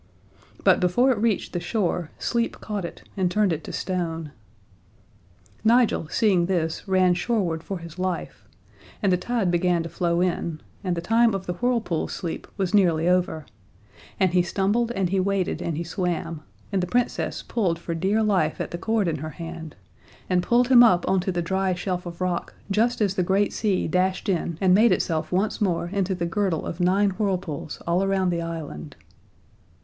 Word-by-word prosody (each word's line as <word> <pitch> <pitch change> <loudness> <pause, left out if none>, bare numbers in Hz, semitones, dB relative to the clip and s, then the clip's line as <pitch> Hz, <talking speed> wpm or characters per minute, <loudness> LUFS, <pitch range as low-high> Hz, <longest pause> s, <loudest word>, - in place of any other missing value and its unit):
But - - +5
before 240 +9 +3
it 235 - 0
reached 220 -2 0
the 175 - -1
shore 175 -3 -1
sleep 235 -1 -1
caught 205 -4 -4
it - - -9
and 185 -3 +1
turned 205 -1 +2
it 160 - -5
to - - -6
stone. 165 -4 -3 1.3
Nigel, 230 -7 +3
seeing 185 -5 +2
this, 170 -1 -1
ran 185 -1 +4
shoreward 175 -4 -1
for 195 +3 -5
his 170 0 -10
life 185 -2 -3 0.6
and 195 - +3
the - - +3
tide 225 -3 0
began 175 -1 +2
to 165 - -6
flow 170 0 0
in, 170 -3 -1 0.2
and 180 -3 -1
the - - -1
time 225 +3 +3
of 190 -1 -4
the 180 - -2
whirlpools' 230 -5 -1
sleep 170 -4 -5
was 190 -1 -1
nearly 170 -5 +3
over, 180 -4 +1 0.7
and 190 -3 +2
he 180 - +5
stumbled 200 +6 0
and 190 -5 0
he 195 - +2
waded 195 -1 0
and 165 -3 -2
he 170 - -2
swam, 170 -2 -3 0.3
and 195 -2 +1
the 180 - -2
Princess 245 +4 -1
pulled 185 -8 0
for 170 0 -5
dear 195 +6 +1
life 190 -7 +1
at - - -3
the 175 - -5
cord 220 -1 +1
in 165 - -1
her 155 +2 -5
hand, 165 -1 -8 0.5
and 180 -1 +2
pulled 240 +6 +2
him 250 -2 +8
up 185 -8 +5
on 190 - +3
to 185 +1 -1
the 175 -1 -1
dry 190 +1 0
shelf 180 0 -3
of 170 +1 -8
rock 180 -1 -2 0.2
just 230 +4 +1
as 200 -3 +2
the 190 - 0
great 195 +3 +1
sea 205 -4 0
dashed 185 +4 0
in 170 -4 -1
and 185 -2 +4
made 220 +4 +5
itself 160 -2 0
once 195 +5 0
more 175 -3 0
into 195 -1 0
the 170 -1 -2
girdle 170 -1 -1
of 170 - -5
Nine 195 +3 +3
Whirlpools 180 -7 -3
all 175 +3 +1
around 195 -2 +1
the 170 -1 -1
island. 160 - -6
185 Hz, 190 wpm, -24 LUFS, 170-200 Hz, 1.3 s, him